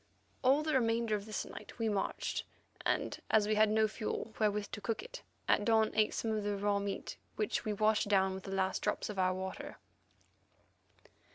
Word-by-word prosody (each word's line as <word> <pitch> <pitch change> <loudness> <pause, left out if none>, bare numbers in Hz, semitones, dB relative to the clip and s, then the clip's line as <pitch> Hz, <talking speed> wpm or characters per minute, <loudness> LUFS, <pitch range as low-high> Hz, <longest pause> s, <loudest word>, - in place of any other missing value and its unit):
All 275 +4 +5
the 310 0 0
remainder 230 -3 +2
of 205 0 -5
this 215 - -3
night - - -10
we 230 -1 0
marched, 205 -2 -1 0.4
and, - - 0
as 210 -1 +4
we 215 - +2
had 215 0 +5
no 220 0 +4
fuel 215 +1 -4
wherewith 210 -1 +1
to 210 - -5
cook 220 +2 -2
it, - - -9 0.3
at - - +4
dawn 220 0 +3
ate 215 -1 +2
some 225 - -1
of 215 -1 -1
the 205 0 -1
raw 200 0 +1
meat, 200 0 -4 0.2
which 215 - -1
we 215 - 0
washed 215 0 +2
down 190 -2 +3
with 190 0 -7
the 195 - -5
last 190 -1 0
drops - - -1
of 200 - -5
our 185 0 +2
water. 190 +11 -5
215 Hz, 195 wpm, -34 LUFS, 200-220 Hz, 0.4 s, All